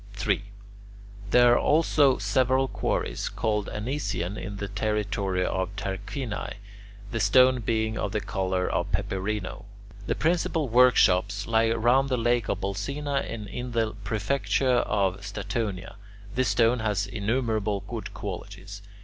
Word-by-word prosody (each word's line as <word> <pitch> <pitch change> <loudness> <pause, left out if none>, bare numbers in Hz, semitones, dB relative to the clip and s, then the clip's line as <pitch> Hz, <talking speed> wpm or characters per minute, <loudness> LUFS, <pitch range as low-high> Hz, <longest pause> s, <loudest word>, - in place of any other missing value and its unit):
3. 100 -1 0 0.9
There 120 +2 +6
are - - +4
also 145 -3 +3
several 130 +1 +2
quarries - - -2
called 105 -2 -1
Anician 105 -6 -3
in 100 -1 -6
the 100 - -4
territory 100 -3 -1
of 95 +1 -2
Tarquinii, 100 +4 -4 0.6
the 115 - -2
stone 125 +5 +5
being 110 -1 -1
of 100 - -2
the 105 - 0
colour 95 -2 -1
of - - -1
peperino. 95 +1 -3 0.4
The - - 0
principal 165 -2 +1
workshops 105 -5 +4
lie 115 0 +2
round 120 +4 +3
the 130 - +1
lake 120 -2 +1
of - - -1
Bolsena 140 +9 -2
and 110 -2 -5
in 125 +3 -6
the 115 -2 0
prefecture 110 +3 +1
of 95 -2 0
Statonia. 100 -1 -4 0.4
This 130 0 +1
stone 115 +1 +3
has 105 -2 0
innumerable 110 -2 -1
good - - -6
qualities. 100 +1 -7
110 Hz, 130 wpm, -26 LUFS, 100-125 Hz, 0.9 s, There